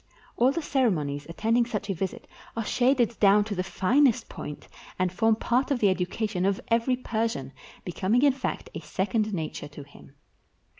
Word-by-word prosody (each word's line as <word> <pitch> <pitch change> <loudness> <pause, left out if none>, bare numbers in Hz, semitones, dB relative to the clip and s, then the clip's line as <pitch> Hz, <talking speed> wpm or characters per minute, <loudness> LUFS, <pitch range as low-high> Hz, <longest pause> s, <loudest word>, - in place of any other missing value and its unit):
All 250 +3 +4
the 335 +3 -3
ceremonies 155 - 0
attending 230 +7 +1
such 210 -4 -3
a 195 - -1
visit 195 +7 -5 0.3
are 225 - -1
shaded 245 -2 +2
down 205 0 +5
to 210 0 -4
the 185 - -1
finest 235 +6 +2
point, 150 - -8 0.3
and 185 -1 0
form 225 +3 +3
part 245 +5 0
of 280 - +1
the 210 -4 +3
education 185 +1 -1
of 195 0 +1
every 235 +2 +2
Persian, 225 - -3 0.3
becoming 195 +8 +1
in 285 -2 +5
fact 265 - -4
a - - -5
second 210 +3 -1
nature 160 -7 -4
to 145 0 -10
him. 75 - -17
215 Hz, 170 wpm, -27 LUFS, 185-240 Hz, 0.3 s, down